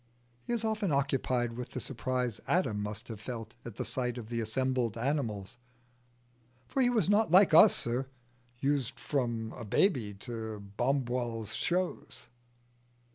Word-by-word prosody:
He - - -6
is 235 -2 0
often 215 -4 0
occupied 130 -4 +1
with 125 +1 -6
the - - -2
surprise 125 -2 -2
Adam 115 - +1
must 105 +3 -5
have 110 -3 -7
felt 115 -1 -6
at 120 -4 -8
the 125 - -3
sight 125 +1 -2
of 115 -2 -7
the 115 -1 -1
assembled 125 0 0
animals 120 -5 -2 1.1
"for 270 - 0
he 245 - +5
was 225 -8 +2
not 205 -1 +4
like 185 +1 +6
us, 195 +6 +9
sir, 125 +3 -1 0.5
used 140 -2 0
from 120 -5 -1
a 120 - -7
b'y 110 - +1
to 110 -3 -5 0.2
Wombwell's 120 -4 0
shows." 180 +1 -2
125 Hz, 145 wpm, -31 LUFS, 115-140 Hz, 1.1 s, us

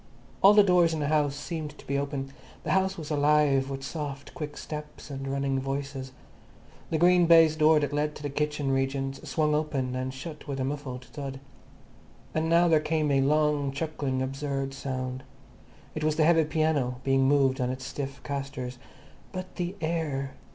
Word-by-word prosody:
All 200 +2 +8
the 210 - +8
doors 175 -4 +4
in - - -3
the 145 -1 -1
house 150 -2 +2
seemed 150 +1 -5
to - - -14
be 140 - -2
open. 140 -1 -3 0.3
The - - -2
house 190 0 +2
was 155 -2 -6
alive 145 -2 +3
with 135 0 -5
soft, 145 -1 -5
quick 150 -2 -6
steps 150 -1 -7
and 135 0 -5
running 135 0 0
voices. 135 0 -4 0.8
The 160 - +1
green 175 +1 +5
baize 165 -2 +7
door 155 0 +5
that 145 -1 -2
led 150 +1 0
to 150 - -10
the 145 - -2
kitchen 150 -1 -1
regions 135 0 -2
swung 150 -2 +1
open 140 -4 -1
and 130 0 -2
shut 150 +4 -8
with 140 -1 -3
a - - 0
muffled 130 -2 -4
thud. 135 +2 -7 0.9
And 160 +1 0
now 170 +1 +5
there 160 -2 +5
came 155 -1 0
a 135 -1 +3
long, 150 0 +2
chuckling 140 -3 -2
absurd 135 0 -3
sound. 130 -2 -4 0.7
It 155 - -4
was 155 0 +2
the 155 - +3
heavy 165 -1 +5
piano 150 -5 0
being 135 0 +3
moved 135 -2 +3
on 125 - 0
its 130 0 -5
stiff 140 0 -5
castors. 135 -3 -5 0.5
But 185 0 -7
the 180 +1 -2
air! 155 -5 -2
145 Hz, 180 wpm, -28 LUFS, 135-155 Hz, 0.9 s, All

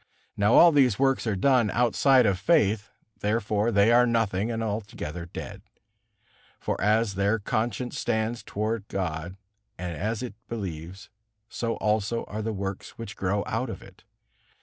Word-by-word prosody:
Now 105 +3 +3
all 170 - +8
these 130 -8 +4
works 135 -3 +1
are 110 - +1
done 125 +1 +3
outside 125 +3 +4
of 100 -3 +1
faith, 105 - +2 0.3
therefore 105 +1 0
they 100 +1 +4
are 125 +1 +5
nothing 110 -3 0
and 115 -1 -2
altogether 100 -6 -5
dead. 100 +3 -8 1.0
For - - -3
as 105 +1 +2
their 100 +3 +1
conscience 120 +3 -2
stands 110 +2 -1
toward 110 0 -3
God 85 -1 -4 0.4
and 90 -2 -5
as 110 +5 -2
it 125 - -5 0.2
believes, 95 -3 -6 0.4
so 115 -1 -2
also 110 +2 0
are 110 - -5
the 110 +1 -2
works 95 -2 -5
which 110 -4 -7
grow 100 +2 -1
out 125 +3 -2
of - - -7
it. - - -17
110 Hz, 150 wpm, -26 LUFS, 100-115 Hz, 1.0 s, all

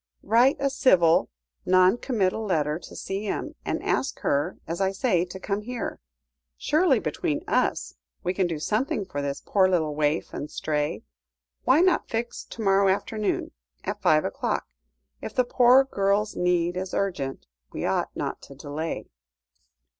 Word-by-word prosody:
"Write 235 +6 +4
a 275 0 +1
civil, 180 - +4 0.3
non 185 +2 +5
committal 220 -4 -1
letter 155 -6 0
to - - -12
C.M., 195 +1 -3
and - - -3
ask 270 - -1
her, 145 0 0
as 170 +3 -3
I 190 0 +2
say, 190 -3 +1
to 185 +1 -9
come 200 +2 -2
here. 240 +1 -5 0.6
Surely, 310 -3 +3
between 310 +6 -2
us, - - 0 0.3
we 180 - 0
can 185 -1 +1
do 165 -2 -3
something 210 - -1
for 145 -6 -4
this 140 -1 -4
poor 190 -2 +3
little 160 -5 +1
waif 150 +1 0
and 145 - -5
stray. 150 -1 -2 0.6
Why 275 +6 +5
not 370 -1 +2
fix 235 +1 -3
to 230 - -7
morrow 195 0 +4
afternoon, 210 +2 -1 0.3
at - - -4
five 155 0 +4
o'clock? - - -2 0.6
If - - -7
the 255 - +4
poor 250 +2 +6
girl's 205 -4 0
need 180 0 +1
is 185 0 -4
urgent, 140 - -2 0.3
we - - -4
ought - - 0
not - - -4
to 140 - -12
delay." 145 +4 -4
190 Hz, 155 wpm, -26 LUFS, 165-230 Hz, 0.6 s, poor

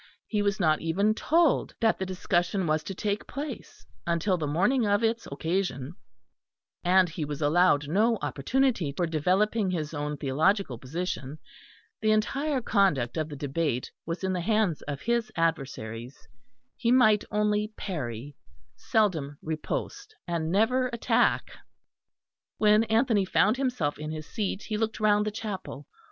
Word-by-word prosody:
He 210 -2 -1
was 200 0 0
not 155 -4 +2
even 195 +6 +2
told 325 +6 +2
that 225 -1 +2
the 190 - -2
discussion 185 +1 0
was 155 -1 +1
to 195 - -5
take 205 +2 -2
place 280 -3 -7 0.2
until 170 +3 +1
the 160 -4 -2
morning 195 - +2
of 205 +2 +2
its 225 +1 0
occasion, 160 -3 -2 0.9
and 185 +1 +5
he 160 -1 -5
was 145 -1 -4
allowed 150 -1 +3
no 220 +8 +2
opportunity 170 - 0
for 175 +5 -1
developing 185 +6 +1
his 160 -4 -3
own 150 0 -3
theological 145 - +1
position; 150 0 -4 0.6
the 215 - +2
entire 265 +6 +1
conduct 185 - +2
of 155 -1 -2
the 145 - -6
debate 140 -2 -2
was 170 +3 -5
in 190 0 0
the 180 - -1
hands 210 -4 +1
of 140 -1 -4
his 235 -1 0
adversaries; 135 -7 -3 0.5
he 235 -1 0
might 220 -5 +5
only 210 0 0
parry, 140 - -5 0.4
seldom 160 - 0
riposte, 410 - -4
and 165 -2 -2
never 250 +6 +2
attack. 235 - +1 1.1
When 210 +1 +4
Anthony 225 -2 +2
found 210 +4 +2
himself 250 - -1
in 155 0 -5
his 155 0 -5
seat 205 0 -3
he 215 - -3
looked 220 0 -2
round 210 0 +3
the - - -1
chapel. 200 -9 -6
185 Hz, 145 wpm, -27 LUFS, 155-215 Hz, 1.1 s, and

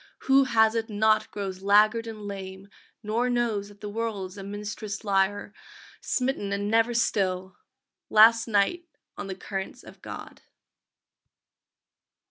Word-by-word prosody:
Who 270 0 +4
has 220 -3 +3
it 225 -1 -2
not 215 +1 +2
grows 190 -2 -5
laggard 215 +3 +4
and 215 -2 -8
lame, 195 -1 -7 0.3
Nor 230 +4 0
knows 235 -5 0
that 205 0 -17
the 210 - -5
world 210 -4 -3
is 195 - -13
a - - -6
Minstrel's 205 +1 -6
lyre, 200 0 0 0.5
Smitten 250 -6 -1
and 205 +1 -2
never 230 +1 +2
still!..._ 190 -5 0 0.6
Last 230 +2 +6
night 230 - +1 0.3
on - - -6
the 190 - -5
currents 195 0 -6
of - - -15
God. - - -9
210 Hz, 135 wpm, -26 LUFS, 200-230 Hz, 0.6 s, Last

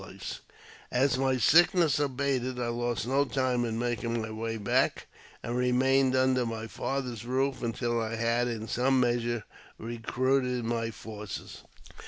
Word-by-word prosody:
38 - - -10
AUTOBIOGBAPEY - - -6
OF - - -10
As 135 -1 +3
my 135 -1 +2
sickness 165 - +5
abated, 130 -2 -1
I 120 -1 -1
lost 120 -3 -2
no 135 +3 +2
time 130 -3 0
in 115 -1 -2
making 120 -1 -1
my 110 0 -4
way 115 +1 -3
back, 100 -2 +1 0.4
and 120 - -3
remained 130 +1 +3
under 130 -1 +3
my 115 -1 -4
father's 125 -1 -3
roof 130 +2 -1
until 120 0 -1
I 110 0 -2
had 115 +1 +1
in 115 -2 -4
some 130 +4 +2
measure 120 -2 0 0.3
recruited 125 +2 -1
my 115 0 -1
forces. 105 -2 -8
120 Hz, 155 wpm, -29 LUFS, 115-130 Hz, 0.4 s, sickness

